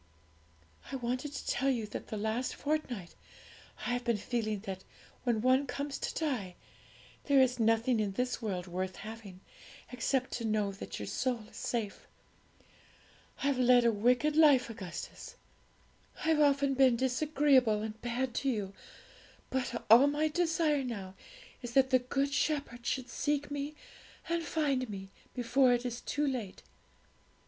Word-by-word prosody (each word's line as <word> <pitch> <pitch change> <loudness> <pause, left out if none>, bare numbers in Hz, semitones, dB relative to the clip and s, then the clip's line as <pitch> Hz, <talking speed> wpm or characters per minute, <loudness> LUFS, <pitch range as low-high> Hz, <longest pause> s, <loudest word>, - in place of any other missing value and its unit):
'I - - -3
wanted 255 +3 -2
to 285 - -6
tell 270 - +1
you 240 -5 0
that 210 - -7
the 215 - -4
last 220 +4 -1
fortnight 260 - -3 0.7
I 245 - 0
have 245 0 -1
been 235 -2 +1
feeling 215 -2 -2
that 190 -2 -6 0.4
when 235 -3 +1
one 260 +3 +3
comes 280 +2 -4
to - - -3
die, 205 - -2 0.7
there 280 -2 +5
is 250 -1 +3
nothing 225 +1 +3
in 205 -2 -1
this 250 +5 -1
world 190 -5 -3
worth 185 +1 -3
having, 215 -4 -9 0.5
except 255 +1 0
to 235 - -3
know 215 -2 +1
that 195 - -7
your - - -5
soul 250 -3 -1
is - - -17
safe. 225 -4 -3 1.4
I've 280 -2 +1
led 250 -1 +5
a 235 - +5
wicked 245 +8 +2
life, 285 -7 +5
Augustus; 180 -6 -8 0.9
I've 320 -1 +3
often 280 -1 +3
been 260 -2 +5
disagreeable 260 -3 +3
and 220 0 -6
bad 245 +1 -2
to 275 - +1
you; 205 -6 -2 0.8
but 250 -2 -2
all 235 +6 +8
my 300 +2 +1
desire 325 -3 +1
now 200 -7 -5 0.5
is 240 -1 -6
that 265 0 +4
the 255 - +6
Good 275 +3 -1
Shepherd 275 -6 -1
should 260 -2 -1
seek 290 0 -1
me 290 +1 -4 0.5
and 335 0 0
find 280 -6 0
me, 195 -1 -7 0.2
before 245 +1 +3
it 245 +1 -1
is 240 0 -4
too 295 +1 -1
late.' 245 -9 -3
250 Hz, 155 wpm, -32 LUFS, 220-275 Hz, 1.4 s, all